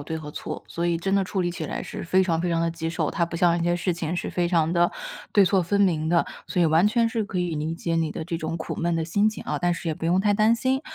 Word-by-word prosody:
对 160 +3 -4
和 150 -2 -7
错， - - -6
所 170 +1 -2
以 170 -1 +1
真 195 +4 -2
的 195 -1 +3
处 190 +1 -2
理 175 -1 0
起 165 -2 -5
来 - - -4
是 - - -6
非 185 +3 +3
常 165 -3 0
非 175 - -1
常 165 -1 +1
地 165 0 +1
棘 165 -1 -4
手。 160 -2 -1
它 170 - 0
不 170 - -9
像 170 -1 +3
那 - - -3
些 175 0 +2
事 175 +1 0
情 170 0 -3
是 175 - -3
非 175 -1 0
常 165 -2 +2
地 175 0 +3 0.4
对 200 - +6
错 190 +1 +3
分 200 +4 0
明 160 -5 +2
的， 170 0 +3 0.2
所 180 - +1
以 - - +5
完 160 +4 +4
全 230 +2 +2
是 225 -1 -1
可 200 - -6
以 175 -3 -2
理 155 +2 -2
解 165 0 -2
你 160 -2 0
的 160 - -5
这 165 0 -3
种 165 +1 -3
苦 155 - -5
闷 170 0 0
的 165 -1 0
心 200 +6 +2
情 215 - -6
啊， - - -2
但 175 0 +2
是 170 - -5
也 160 - -1
不 - - -7
用 175 +3 +3
太 205 +1 +3
担 215 +2 +4
心。 260 +3 0
170 Hz, 340 characters per minute, -25 LUFS, 165-190 Hz, 0.4 s, 对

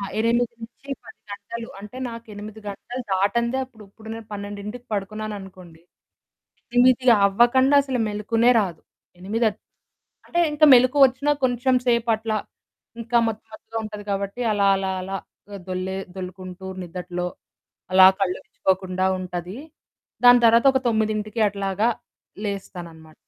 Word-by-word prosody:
ఆ! - - -5 0.2
8 235 +2 +1
నుంచి 240 +4 -11
10 - - -14
గంటలు. 230 +3 -7
అంటే 210 +5 -10
నాకు 230 0 -9
8 210 +1 -9
గంటలు 240 +5 -7
దాటందే, 235 +6 +1
అప్పుడు 235 -4 -17
ఇప్పుడు 220 +2 -14
నేను 225 -1 -9
12కి 205 +4 -7
పడుకున్నాననుకోండి, 195 -4 -6 0.9
ఎనిమిదవ్వకండా 245 +1 +5
అసలు 265 -2 -3
మెలుకువనే 225 +3 +2
రాదు. 180 -6 -4 0.4
8 220 +5 0 0.8
అంటే 345 - 0
ఇంకా 300 +1 +4
మెలుకువొచ్చినా 260 +2 +4
కొంచెం 255 +1 +2
సేపట్లా 225 -2 +1 0.6
ఇంకా 235 +1 +1
మత్తు 220 0 -6
మత్తుగా 225 +1 -7
ఉంటది 210 -1 -7
కాబట్టి, 200 +3 -3
అలా 200 -1 +2
అలా 190 0 -2
అలా 195 +1 -4 0.5
దొల్లే 185 +1 -3 0.2
దొల్లుకుంటూ 185 0 -8 0.2
నిద్దట్లో 180 0 -5 0.7
అలా 185 0 +9
కళ్లువిచ్చుకోకుండా 185 0 -1
ఉంటది. 180 +3 -6 0.7
దాని 245 0 +8
తర్వాత 230 +3 +5
ఒక - - +4
9కి 215 0 -1
అట్లాగా 200 +2 -1 0.6
లేస్తాననమాట. 170 -5 -7
210 Hz, 115 wpm, -23 LUFS, 190-235 Hz, 0.9 s, అలా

